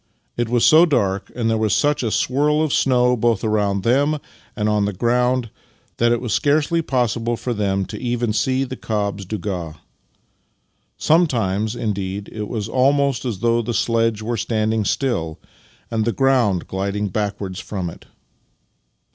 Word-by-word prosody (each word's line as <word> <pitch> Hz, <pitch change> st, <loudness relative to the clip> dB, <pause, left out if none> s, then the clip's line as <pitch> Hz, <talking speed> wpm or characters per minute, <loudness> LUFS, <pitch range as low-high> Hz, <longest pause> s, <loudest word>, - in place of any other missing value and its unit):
It 120 Hz, -1 st, -1 dB
was 120 Hz, -1 st, +3 dB
so 165 Hz, +2 st, +7 dB
dark, 100 Hz, -, 0 dB
and 115 Hz, -2 st, -1 dB
there 110 Hz, -1 st, +1 dB
was 110 Hz, -3 st, +2 dB
such 145 Hz, 0 st, +1 dB
a 115 Hz, -, -1 dB
swirl 150 Hz, +7 st, +1 dB
of 155 Hz, -, -1 dB
snow 125 Hz, -2 st, +3 dB
both 115 Hz, -2 st, +1 dB
around 100 Hz, -3 st, 0 dB
them 140 Hz, +7 st, +2 dB, 0.4 s
and 105 Hz, -1 st, -1 dB
on 105 Hz, -1 st, +2 dB
the 105 Hz, -, -2 dB
ground, 125 Hz, +3 st, +1 dB, 0.5 s
that 120 Hz, 0 st, +3 dB
it 120 Hz, -, +2 dB
was 120 Hz, -3 st, -3 dB
scarcely 155 Hz, +3 st, +2 dB
possible 120 Hz, -4 st, -1 dB
for 125 Hz, -, -3 dB
them 100 Hz, -3 st, 0 dB
even 120 Hz, -2 st, -1 dB
to 110 Hz, -, -1 dB
see 130 Hz, 0 st, +1 dB
the 130 Hz, -1 st, -5 dB
cob's 100 Hz, -4 st, -3 dB
douga. 90 Hz, -5 st, -4 dB, 1.2 s
Sometimes, 115 Hz, -, +1 dB
indeed, 100 Hz, -3 st, -3 dB
it 105 Hz, -1 st, -4 dB
was 110 Hz, -2 st, -3 dB
almost 135 Hz, 0 st, +2 dB
as 110 Hz, -6 st, -3 dB
though 115 Hz, 0 st, +2 dB
the 115 Hz, 0 st, -3 dB
sledge 115 Hz, -2 st, +1 dB
were 115 Hz, +1 st, -2 dB
standing 110 Hz, 0 st, 0 dB
still 85 Hz, -, -1 dB, 0.5 s
and 110 Hz, -1 st, 0 dB
the 115 Hz, -, +1 dB
ground 120 Hz, -9 st, +2 dB
gliding 100 Hz, +2 st, -2 dB
backwards 100 Hz, -2 st, -3 dB
from 95 Hz, -4 st, -4 dB
it. 85 Hz, -, -10 dB
115 Hz, 160 wpm, -21 LUFS, 105-125 Hz, 1.2 s, so